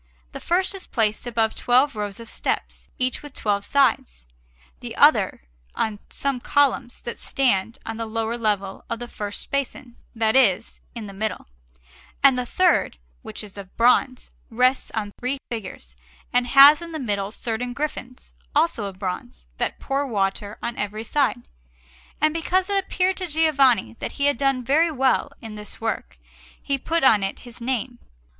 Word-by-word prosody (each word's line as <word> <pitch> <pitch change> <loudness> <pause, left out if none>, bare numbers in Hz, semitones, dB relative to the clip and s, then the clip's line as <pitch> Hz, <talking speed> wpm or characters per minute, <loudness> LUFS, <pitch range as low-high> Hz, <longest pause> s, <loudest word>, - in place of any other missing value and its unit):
The - - -7
first 370 +3 +1
is 390 - -9
placed 220 0 0
above 225 -2 +1
twelve 255 +2 +2
rows 205 -1 -4
of 230 - -10
steps, - - -3
each 255 -1 0
with 290 -2 -11
twelve 205 -4 -1
sides; 220 - +1 0.5
the - - -7
other - - +4 0.3
on 210 -2 -1
some 275 -2 -2
columns 270 -2 +1
that 235 - -6
stand 230 -5 0
on 225 0 -5
the 230 0 -4
lowest 225 +1 -2
level 200 -3 -1
of - - -2
the 240 +1 -7
first 205 -3 -7
basin 265 -3 -3 0.2
that 225 0 +1
is, 225 -5 +2
in 230 -2 -6
the 200 - -9
middle; 215 +1 -3 0.8
and 275 -2 +7
the 250 -1 -2
third, 360 - +2 0.2
which - - -6
is 205 -2 -12
of 190 -1 -12
bronze, 250 +2 +2 0.2
rests 250 +3 +2
on 210 -2 -2
three 255 +3 -1
figures, 185 - -7 0.4
and 245 0 +2
has 280 +4 +8
in 335 -1 -8
the 315 - -4
middle 205 -5 -2
certain 240 +2 -3
griffins, 255 -2 -6 0.2
also 300 -8 +2
of 195 -2 -7
bronze, 180 - -5
that - - -2
pour 275 +1 -1
water 205 -2 -2
on 235 - -3
every 210 +2 -3
side; 265 - 0 0.7
and 310 0 +2
because 365 +4 0
it 395 -1 +2
appeared 370 0 0
to 370 - -3
Giovanni 280 - +3
that - - -4
he 280 - 0
had 285 -3 +3
done 270 -1 +1
very 315 +6 +3
well 270 0 +1
in 220 -1 -7
this 210 -1 -9
work, 225 -1 -3 0.4
he 275 -1 -1
put 330 +4 0
on 220 -6 +6
it 195 0 -3
his 240 -1 -11
name. 245 0 -3
240 Hz, 170 wpm, -23 LUFS, 210-275 Hz, 0.8 s, has